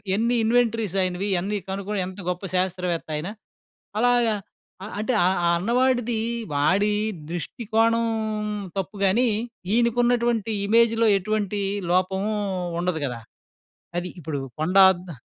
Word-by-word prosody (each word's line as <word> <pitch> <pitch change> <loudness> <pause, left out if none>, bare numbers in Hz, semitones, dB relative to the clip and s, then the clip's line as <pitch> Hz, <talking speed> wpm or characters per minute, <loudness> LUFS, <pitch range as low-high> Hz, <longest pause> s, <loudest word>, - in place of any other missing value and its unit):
ఎన్ని 235 +3 +1
ఇన్వెంటరీసాయినవి. 210 -5 +1
ఇయన్నీ 195 +3 0
కనుగొని 200 +1 -3
ఎంత 190 +2 -9
గొప్ప 180 +2 -3
శాస్త్రవేత్త 180 -2 -1
ఆయన. 150 +3 -3 0.7
అలాగా 240 -2 +3 0.5
ఆహ్, 205 - -7
అంటే, 220 +4 0
ఆహ్, 185 +1 +2
ఆ - - +4
అన్నవాడిదీ 240 +2 +1 0.3
వాడీ 195 +9 +2 0.4
దృష్టి 175 +7 -5
కోణం 230 +1 +3 0.7
తప్పు 195 +2 -3
గానీ, 230 +7 +3 0.5
ఈనకున్నటువంటి 235 -1 +2
ఇమేజ్‌లో 230 +1 +4
ఎటువంటీ 210 0 -1 0.3
లోపమూ 190 +3 +1 0.5
ఉండదు 175 -3 -1
గదా? 125 -3 -4 0.8
అది 180 +1 -3
ఇప్పుడూ 145 -2 -4 0.2
కొండ 180 +5 +2
అద్ద్ 175 -8 -10
205 Hz, 115 wpm, -24 LUFS, 180-230 Hz, 0.8 s, ఆ